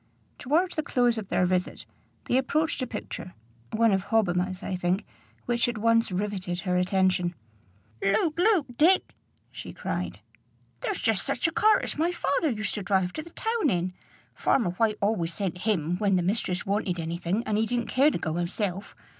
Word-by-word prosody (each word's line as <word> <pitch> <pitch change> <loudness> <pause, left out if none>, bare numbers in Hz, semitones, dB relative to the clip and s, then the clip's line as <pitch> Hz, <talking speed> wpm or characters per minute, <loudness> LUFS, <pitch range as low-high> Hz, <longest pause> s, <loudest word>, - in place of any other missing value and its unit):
Towards 335 +7 +1
the 310 - +1
close 245 -5 +1
of 205 - -7
their 180 - +2
visit, 180 0 -1 0.4
they - - 0
approached 295 +4 +1
a 255 - -1
picture 180 - -7 0.4
one 225 0 +3
of 190 -1 +1
Hobbima's, 185 -4 0
I 185 - -2
think 180 +2 0 0.4
which 240 0 +1
at 235 - -4
once 230 0 +3
riveted 185 -2 -2
her 180 -1 -1
attention. 180 -1 +2 0.7
"Look, 220 - +1
look, 370 -5 +4
Dick!" 360 +5 +4 0.4
she - - -8
cried. - - -4 0.6
"There's 425 -7 -2
just 225 -4 +2
such 250 - 0
a - - -1
cart 430 +6 +4
as - - -3
my 335 +3 +2
father 340 -2 0
used 215 -4 -2
to 210 - -3
drive 190 -2 +1
to - - -4
the 335 - -12
town 445 - 0
in. 180 -1 -1 0.4
Farmer 225 -9 +1
White 215 +3 +1
always 195 -5 0
sent 185 -3 -3
him 175 -4 +1
when 200 -1 +2
the 180 - +2
mistress 185 -1 -1
wanted 195 -3 -1
any 165 +1 -3
thing 185 +6 -1
and 215 -3 0
he 220 - +1
didn't 240 0 -1
care 275 +4 +4
to - - -2
go 160 - -3
hisself. 180 +3 -3
210 Hz, 185 wpm, -27 LUFS, 180-250 Hz, 0.7 s, look